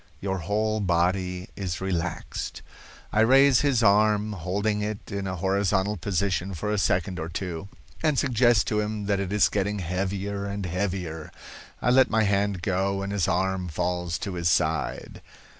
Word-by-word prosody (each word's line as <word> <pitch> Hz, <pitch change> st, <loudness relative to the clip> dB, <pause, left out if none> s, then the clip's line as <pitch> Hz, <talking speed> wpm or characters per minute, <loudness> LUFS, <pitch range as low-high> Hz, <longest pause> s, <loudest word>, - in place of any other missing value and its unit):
Your 95 Hz, +1 st, -2 dB
whole 110 Hz, +5 st, 0 dB
body 90 Hz, 0 st, 0 dB
is 90 Hz, -4 st, -3 dB
relaxed.' 90 Hz, -3 st, -3 dB, 0.5 s
I 105 Hz, -, +2 dB
raise 135 Hz, +3 st, +6 dB
his 135 Hz, -5 st, +2 dB
arm, 105 Hz, 0 st, +3 dB
holding 100 Hz, +4 st, -1 dB
it 105 Hz, 0 st, -5 dB
in 100 Hz, -1 st, -3 dB
a 95 Hz, -, -3 dB
horizontal 95 Hz, +2 st, +1 dB
position 95 Hz, -2 st, -1 dB
for 105 Hz, +6 st, -3 dB
a 105 Hz, -, +1 dB
second 90 Hz, -1 st, 0 dB
or 80 Hz, +1 st, -4 dB
two, 85 Hz, +1 st, -5 dB, 0.3 s
and 155 Hz, -3 st, +2 dB
suggest 120 Hz, -5 st, +3 dB
to 105 Hz, -, +1 dB
him 105 Hz, -1 st, -2 dB
that 100 Hz, -1 st, +1 dB
it 100 Hz, -1 st, -3 dB
is 105 Hz, -1 st, +4 dB
getting 105 Hz, 0 st, -1 dB
heavier 100 Hz, +2 st, -2 dB
and 100 Hz, -1 st, -4 dB
heavier. 90 Hz, -3 st, -3 dB, 0.5 s
I 120 Hz, -, +3 dB
let 130 Hz, +1 st, +5 dB
my 110 Hz, 0 st, +2 dB
hand 100 Hz, -2 st, 0 dB
go 95 Hz, +1 st, 0 dB
and 100 Hz, +1 st, -3 dB
his 100 Hz, -4 st, +1 dB
arm 95 Hz, 0 st, 0 dB
falls 90 Hz, +1 st, -2 dB
to 100 Hz, -, -3 dB
his 85 Hz, -2 st, 0 dB
side. 80 Hz, 0 st, -1 dB
100 Hz, 165 wpm, -26 LUFS, 90-105 Hz, 0.5 s, raise